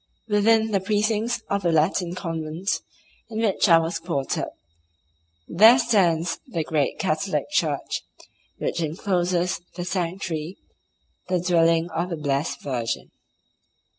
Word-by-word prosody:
Within 220 +1 +3
the 195 - +2
precincts 215 +4 0
of 200 0 -1
the 175 - +1
Latin 170 +3 +1
convent 165 +1 -3 0.5
in 220 -1 -4
which 210 -3 +2
I 165 - +8
was 165 +1 -1
quartered 165 -5 -2 1.0
there 220 +8 +7
stands 185 -9 +2
the 165 -2 -2
great 150 -3 0
Catholic - - -1
church - - 0 0.6
which - - -2
encloses 175 +1 0
the 175 - -4
sanctuary, 175 -2 -3 0.7
the 185 -1 +1
dwelling 165 -1 +2
of 170 +3 -2
the 170 - -3
blessed 145 0 -2
Virgin. 120 -4 -3
175 Hz, 120 wpm, -24 LUFS, 165-200 Hz, 1.0 s, I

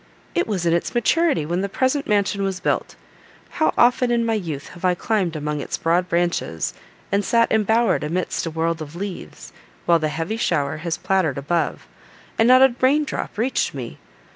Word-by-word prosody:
It 350 - 0
was 190 -5 -2
in 165 - +3
its 170 +7 -1
maturity 285 - +2
when 175 +4 -1
the 200 - -2
present 260 +6 0
mansion 205 -1 +1
was 195 -2 -2
built. 180 - -1 0.7
How 315 - +4
often, 245 +1 +4
in 235 -1 +1
my 225 - +1
youth, 165 -10 -4
have 180 - -14
I 180 -1 +3
climbed 190 -4 -1
among 150 -1 -3
its - - -4
broad 175 +2 +1
branches, 170 - -1 0.4
and 200 +1 +2
sat 230 +3 +2
embowered 220 -2 +2
amidst 170 +2 -2
a - - -1
world 165 +1 -1
of 155 +1 -8
leaves, 185 - -7 0.3
while 170 -1 +4
the 155 - 0
heavy 165 +8 -3
shower 155 -12 0
has 165 +1 -3
pattered 185 -8 0
above, 160 +5 -1 0.5
and 225 - +5
not 255 +1 +7
a 265 -2 +5
rain 280 +4 +4
drop 290 - -5
reached 235 - 0
me! 125 -4 -7
185 Hz, 190 wpm, -22 LUFS, 165-230 Hz, 0.7 s, not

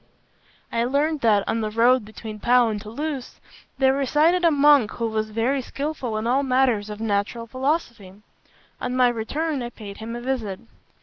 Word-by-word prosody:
"I 230 - 0
learned 290 +4 0
that, 210 -3 +3
on 225 - 0
the 215 - -1
road 235 +2 +3
between 215 0 -9
Pau 245 +1 +4
and 210 -2 -3
Toulouse, 265 +5 -5 0.4
there 265 0 +4
resided 300 +6 +2
a 335 - +6
monk 290 -6 +5
who 230 - -3
was 215 -1 -2
very 235 +5 0
skilful 270 -4 -4
in 215 - -3
all 255 +4 +2
matters 255 -6 +1
of 210 0 -7
natural 220 +2 -1
philosophy. 255 - -2 0.7
On 250 - -2
my 250 -1 +4
return, 275 +6 -2
I 240 - -4
paid 205 -4 -10
him 225 +1 -6
a 240 - -6
visit. 235 -7 -3
240 Hz, 175 wpm, -23 LUFS, 220-275 Hz, 0.7 s, a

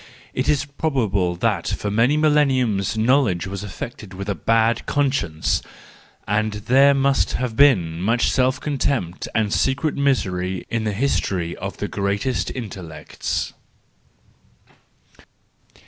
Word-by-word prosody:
It - - -1
is 145 -1 +2
prob¬ 140 -3 -1
able 95 -3 0
that 85 - 0
for 105 - -2
many 120 +8 +3
millenniums 130 -10 +2
knowledge 110 -6 +2
was 95 0 -5
afflicted 105 0 -8
with 100 +2 -5
a - - +1
bad 115 +6 +1
conscience, 135 - 0 0.7
and 105 +1 0
that 105 0 -8
there 135 +3 +6
must 135 0 +2
have 125 -3 -2
been 90 - +4
much 115 +5 +2
self 130 0 +2
contempt 135 - -2
and 110 -2 +1
secret 140 +3 +1
misery 95 -10 0
in 115 -2 -1
the 105 - -1
history 95 -7 -1
of 95 0 -6
the 105 - -3
greatest 100 +6 -1
intellects. 95 -10 -5
110 Hz, 130 wpm, -22 LUFS, 95-135 Hz, 0.7 s, there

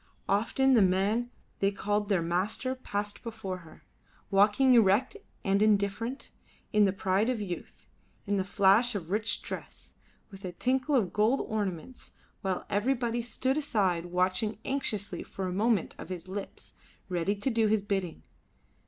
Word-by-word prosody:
Often 245 +6 +2
the 235 - +6
man 200 +6 +2 0.3
they 195 - +3
called 205 +1 -1
their 185 -5 +2
master 190 +9 -1
passed 205 -5 -4
before 220 -5 -5
her, 160 -3 -16 0.5
walking 205 +7 +5
erect 225 - +4 0.3
and 195 0 +2
indifferent, 215 +4 +1 0.4
in 210 -1 +5
the 195 - +3
pride 195 +3 +1
of 250 -3 0
youth, 185 -4 -7 0.4
in 205 0 0
the 190 - +1
flash 200 +5 +3
of 175 -3 -5
rich 215 +2 0
dress, - - -8 0.4
with 195 0 -12
a 180 -2 -5
tinkle 260 - +1
of 210 -9 +1
gold 220 +6 +3
ornaments, 210 +2 -4 0.3
while 190 -2 -2
everybody 235 +2 0
stood 260 +3 -1
aside 190 - 0
watching 185 +5 0
anxiously 220 -7 -2
for 190 - -6
a 180 - -2
movement 215 -1 +1
of - - -8
his 180 -1 -6
lips, 195 +1 -7 0.3
ready 180 +2 0
to 205 +6 -1
do 225 -1 +2
his 210 -1 +2
bidding. 190 - -3
205 Hz, 155 wpm, -29 LUFS, 190-230 Hz, 0.5 s, the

